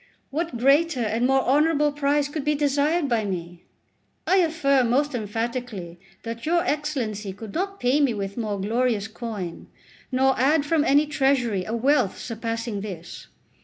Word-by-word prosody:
What 320 -2 -2
greater 280 +4 +3
and 230 +2 +1
more 270 0 +3
honourable 295 +2 +3
prize 285 0 +1
could 295 0 -4
be 300 +1 +1
desired 290 +3 +1
by 235 -4 +1
me? 175 -3 -5 0.6
I 380 - +3
affirm 280 -8 +2
most 285 +4 +1
emphatically 225 -5 -4 0.2
that 230 0 -6
your 340 +2 +1
Excellency 240 -10 -2
could 205 +1 -9
not 390 +3 -3
pay 250 +4 +2
me 265 -6 +2
with 200 -1 -4
more 215 -4 -3
glorious 220 0 0
coin, 215 -6 -6 0.4
nor 265 +1 +3
add 285 +3 +3
from 305 0 +2
any 290 0 +4
treasury 265 -10 +1
a 225 - -3
wealth 260 -3 +2
surpassing 230 -2 -4
this. 180 -5 -8
255 Hz, 155 wpm, -24 LUFS, 220-295 Hz, 0.6 s, any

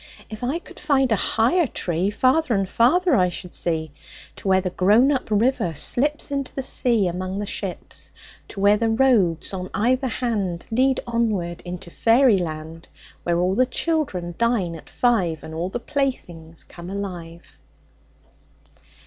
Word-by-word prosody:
If 215 +2 -7
I 265 +6 0
could 345 - -12
find 270 -4 +2
a - - +5
higher 245 - +2
tree 175 -3 -1
Farther 255 +4 +2
and 195 -1 0
farther 305 - +3
I 180 -4 +3
should 180 0 -8
see, 160 -3 -2 0.5
To - - -7
where 190 0 +4
the 185 -1 -3
grown 215 +10 +4
up 265 -5 -2
river 210 -6 +1
slips 290 - 0
Into 275 -2 -2
the 270 - -2
sea 235 -6 +2
among 185 +2 -3
the 205 - -2
ships, 195 -2 -5 0.4
To 200 - -9
where 200 +1 +5
the 225 +1 0
roads 225 -9 +2
on 185 -1 -5
either 255 +5 +1
hand 210 -9 -2
Lead 260 +3 +2
onward 215 -8 -1
into 175 -1 -7
fairy 230 -1 +4
land, 160 -1 -6 0.3
Where 170 -1 0
all 180 +2 +1
the 255 +5 +2
children 255 - -1
dine 230 -7 +1
at 160 - -12
five, 190 -10 +1
And 160 - -8
all 170 +3 -3
the 240 - -4
playthings 175 - -4
come 175 +1 -11
alive. 175 -4 -7
205 Hz, 160 wpm, -23 LUFS, 175-255 Hz, 0.5 s, a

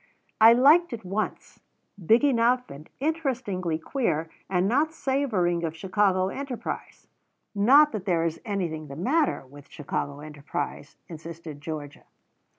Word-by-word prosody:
"I 225 +1 +9
liked 295 +6 +5
it 230 - -5
at - - -20
once. 200 +4 -4 0.4
Big 225 - +4
enough 250 -2 +2
and 145 +3 -11
interestingly 255 - -1
queer, 165 - -2 0.2
and 185 0 +1
not 290 +8 +2
savouring 220 - 0
of 160 -1 -3
Chicago 190 +1 +1
enterprise." 270 +1 -6 0.5
"Not 275 +9 +6
that 205 -4 -5
there 170 -4 +1
is 165 -1 -3
anything 175 -8 -3
the 140 - -8
matter 270 - 0
with 140 +2 -15
Chicago 145 0 -4
enterprise," 145 -1 -6
insisted 160 -2 -9
Georgia. 150 -2 -7
190 Hz, 135 wpm, -26 LUFS, 160-250 Hz, 0.5 s, I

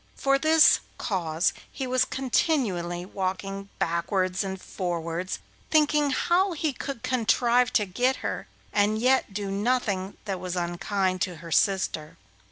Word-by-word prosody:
For 275 0 +2
this 315 +1 +6 0.2
cause 170 -4 0 0.2
he 270 - -4
was 255 0 +2
continually 210 - 0
walking 195 +1 -4
backwards 180 +3 0
and 190 -1 -4
forwards, 175 -1 -3 0.3
thinking 300 -1 +3
how 355 +7 +2
he 310 -2 -1
could 255 -2 -6
contrive 245 0 +2
to 210 - +3
get 245 +8 +1
her, - - -3 0.3
and 210 +1 +2
yet 255 0 +2
do 200 0 -4
nothing 200 -3 -1
that 195 -3 -3
was 180 0 -4
unkind 185 +2 -1
to 180 -1 -1
her 165 +1 -10
sister. 190 -5 +1
200 Hz, 135 wpm, -26 LUFS, 185-255 Hz, 0.3 s, this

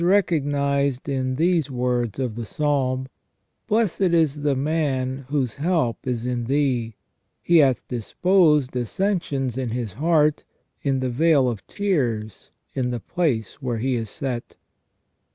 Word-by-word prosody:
recognized 140 -7 +1
in 130 -2 -1
these 165 0 +2
words 125 -3 -1
of 130 -4 -2
the 115 +2 -5
Psalm: 130 0 0 0.3
" - - -51
Blessed 215 -4 +1
is 165 -5 +2
the 145 -1 +1
man 135 -2 -1
whose 135 -6 0
help 150 -6 -1
is 120 -2 -2
in 125 -1 -2
Thee: 125 -4 0 0.4
he 170 - +3
hath 135 -5 +3
disposed 150 - +2
ascensions 135 - -1
in 130 -2 -2
his 115 -4 -3
heart, 150 - +2 0.4
in 135 -2 0
the 130 - 0
vale 145 0 +3
of 115 -5 -4
tears, 120 - -2 0.2
in 125 -2 -1
the 120 -1 -2
place 140 - -2
where 125 -3 -2
he 130 +4 0
is 115 -3 -2
set 125 0 -5
135 Hz, 140 wpm, -23 LUFS, 125-155 Hz, 0.4 s, he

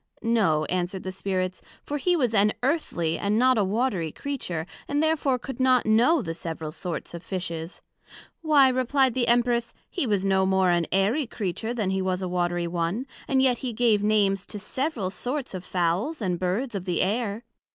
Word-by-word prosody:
No, 200 -10 +2
answered 180 +2 -2
the 185 - -4
Spirits, 185 -1 -2 0.2
for 290 0 -3
he 355 +5 +2
was 250 -8 +1
an 210 0 +4
Earthly, 245 - 0
and 205 +1 +1
not 255 0 +4
a - - +3
Watery 195 -5 0
Creature; 180 - -4 0.2
and 290 +2 +1
therefore 300 -5 +2
could 265 +2 -8
not 255 -1 +4
know 240 +7 +4
the 165 - -3
several 160 -2 -5
sorts 175 +2 -6
of 170 - -6
Fishes. 170 -2 -5 0.6
Why, 300 -4 +5
replied 255 0 +2
the 245 -1 0
Empress, 240 0 +2 0.2
he 345 -9 -1
was 200 -3 +1
no 190 -1 +3
more 190 -1 +3
an 170 -1 +1
Airy 220 +9 +2
Creature 220 +2 -3
then 205 -5 0
he 190 0 0
was 185 0 -1
a - - -1
Watery 175 -1 0
one, 170 +8 -2 0.2
and 265 -1 +3
yet 250 -3 +3
he 250 -3 -3
gave 220 -2 +3
Names 205 -2 +2
to - - -8
the 210 - -4
several 250 - -2
sorts 255 +6 -3
of 185 -1 -5
Fowls 185 - -1
and 180 -5 -1
Birds 200 +8 -1
of 195 -3 -4
the 175 -3 0
Air. 215 +2 -1
210 Hz, 195 wpm, -26 LUFS, 185-255 Hz, 0.6 s, Why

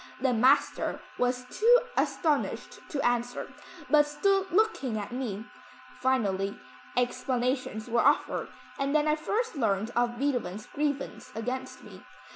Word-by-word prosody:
The 260 -1 +2
master 245 +4 +3 0.2
was 250 0 0
too 475 +3 +7 0.2
astonished 305 -4 0
to 280 - -2
answer, 245 0 -1 0.3
but 295 -1 +5
stood 390 +5 +1
looking 365 - +1
at 205 +1 -5
me. 235 -4 -4 0.5
Finally, 200 -6 0 0.4
explanations 250 -2 -1
were 235 0 +1
offered 285 +1 +2 0.3
and 275 +2 0
then 305 0 +3
I 305 - +4
first 430 +9 -2
learned 220 -4 0
of 240 0 +1
Beethoven's 240 -7 -1
grievance 285 -1 -3
against 250 +4 -4
me. - - -12
255 Hz, 125 wpm, -29 LUFS, 235-295 Hz, 0.5 s, too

